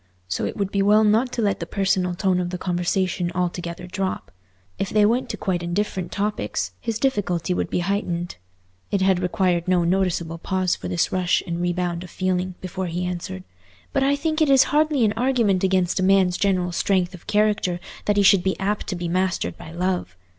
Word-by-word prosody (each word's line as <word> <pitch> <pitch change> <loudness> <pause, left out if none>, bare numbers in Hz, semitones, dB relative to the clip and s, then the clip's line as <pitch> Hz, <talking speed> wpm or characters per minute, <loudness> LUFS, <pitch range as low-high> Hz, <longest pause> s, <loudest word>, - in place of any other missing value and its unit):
So 90 - -2
it - - -4
would 200 -2 -1
be 200 - +1
well 210 +2 +5
not 220 +4 +3
to 235 - -1
let 200 -1 +1
the - - -5
personal 190 -2 0
tone 185 -1 +1
of 175 -1 -2
the 180 - -4
conversation 180 0 -1
altogether 175 -1 -3
drop. 190 +1 -3 0.5
If 195 - -1
they 210 -1 +4
went 240 +4 +1
to - - -4
quite 180 -3 -1
indifferent 180 0 -2
topics, 105 - -2
his 225 -2 -2
difficulty 190 -9 0
would - - -2
be 180 - 0
heightened. 175 - -2 0.5
It 200 - 0
had 190 -1 +3
required 180 -1 0
no 180 -1 +3
noticeable 170 -2 0
pause 185 0 0
for - - -7
this 170 - 0
rush 180 -1 +1
and 170 -1 -3
rebound 175 -1 -1
of 180 - -10
feeling, 185 0 -1
before 185 0 -4
he 175 +2 -2
answered, 170 - -5 0.5
"But 275 - +2
I 275 +1 +3
think 310 +2 -1
it 310 - +4
is 270 -1 +7
hardly 300 -5 +3
an 210 - +2
argument 225 -6 +1
against 185 -1 +2
a - - +1
man's 190 -2 +4
general 185 -2 +1
strength 180 +1 +1
of 180 - -13
character 210 -4 +1 0.3
that 205 0 +1
he 200 - +5
should 195 -1 +6
be 190 +1 -1
apt 205 +2 -1
to 185 - -2
be 175 0 -3
mastered 180 - -1
by 160 - -11
love. 175 - -2
185 Hz, 205 wpm, -23 LUFS, 175-205 Hz, 0.5 s, is